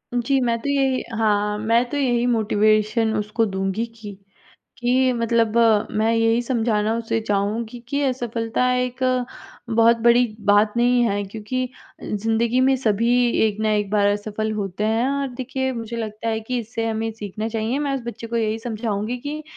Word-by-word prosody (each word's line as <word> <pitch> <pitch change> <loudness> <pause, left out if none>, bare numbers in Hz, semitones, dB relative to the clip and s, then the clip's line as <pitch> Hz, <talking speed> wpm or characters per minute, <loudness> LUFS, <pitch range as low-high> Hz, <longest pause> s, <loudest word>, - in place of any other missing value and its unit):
जी, 255 +3 +1
मैं 235 -1 +1
तो 285 - -3
यही 270 -2 +1 0.2
हाँ, 210 -1 +1
मैं 230 +3 +2
तो 290 - -3
यही 245 -4 +1
मोटिवेशन 215 0 +2
उसको 215 +2 0
दूँगी 195 +2 -2
कि, 225 -3 -10 0.6
कि 255 +1 +2
मतलब 230 -1 +1 0.4
मैं 220 +1 +2
यही 225 +1 +2
समझाना 225 -3 0
उसे 225 0 -1
चाहूँगी 215 +4 -1
कि 280 +2 0
असफलता 240 -1 -1
एक 250 0 -2 0.7
बहुत 230 +1 +4
बड़ी 240 +1 +6 0.2
बात 205 +1 +4
नहीं 245 0 +3
है, 205 -1 -1
क्योंकि 225 +5 -4 0.3
ज़िंदगी 225 +4 0
में 265 +1 +4
सभी 230 -1 +1 0.4
एक 210 -1 -4
ना 215 0 +1
एक 205 -1 0
बार 205 -1 +3
असफल 210 +1 -2
होते 200 -1 -3
हैं 225 +3 +1
और 280 0 -1
देखिए, 265 +1 -2
मुझे 230 -1 -5
लगता 220 0 -4
है 220 0 -1
कि 245 +3 -2
इससे 230 0 -4
हमें 225 0 -2
सीखना 215 0 -5
चाहिए। 225 +4 -1
मैं 285 -2 -1
उस 265 - -4
बच्चे 230 -1 -6
को 235 - -2
यही 220 -1 -1
समझाऊँगी 220 0 -3
कि 305 +1 -5
225 Hz, 170 wpm, -22 LUFS, 215-245 Hz, 0.7 s, बड़ी